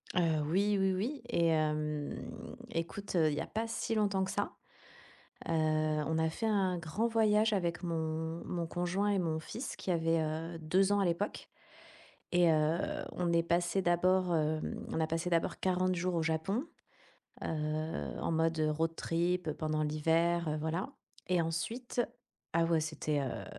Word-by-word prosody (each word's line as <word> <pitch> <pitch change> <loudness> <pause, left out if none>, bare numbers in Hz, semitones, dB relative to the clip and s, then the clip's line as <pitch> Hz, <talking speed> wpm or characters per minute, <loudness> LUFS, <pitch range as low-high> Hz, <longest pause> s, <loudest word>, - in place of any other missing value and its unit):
Heu, 165 -3 +3
oui, 200 +5 +2
oui, 190 -1 +3
oui 240 +10 -2
et 170 -1 +3
hem, 150 -2 0 0.5
écoute, 180 +4 -3
heu, 160 -2 +5
il - - -1
y 150 - -1
a - - -3
pas 225 +1 -2
si 225 - -2
longtemps 200 -3 +2
que 190 - -2
ça, - - -1 0.9
heu, - - -2
on 155 0 +1
a 160 0 +2
fait 225 +7 -2
un 190 -4 +2
grand 170 +8 -1
voyage 220 -1 +3
avec 175 -2 -1
mon 160 -1 -2
mon 170 -1 -2
conjoint 180 +4 0
et 200 -2 +2
mon 160 -2 0
fils 235 - -6
qui 185 - -3
avait, 165 -1 +2
heu, 160 +2 -2
2 185 +5 +2
ans 205 - +3
à 195 - +3
l'époque 175 +4 -1 0.9
et 175 -1 +5
heu, 155 +1 +3 0.4
on 175 -1 0
est 170 0 +3
passé 175 +2 +1
d'abord, 180 0 +3
hem, 155 0 -1
on - - -2
a 160 - +2
passé 165 +2 -1
d'abord 170 -1 +1
40 185 0 +2
jours 180 0 -1
au 165 - +2
Japon, 165 - 0 0.8
heu, - - -2 0.7
en - - -1
mode, 160 0 +1
heu, 155 - +3
road 165 +2 0
trip 175 0 0
pendant 155 0 -1
l'hiver, 165 +3 +2
heu, 155 - -1
voilà 160 +5 -2 0.4
et 180 -2 +3
ensuite 225 +10 -2 0.5
ah 165 0 +4
ouais, 165 -1 +2
c'était, 155 -1 -1
heu, 135 - -4
170 Hz, 175 wpm, -33 LUFS, 160-185 Hz, 0.9 s, heu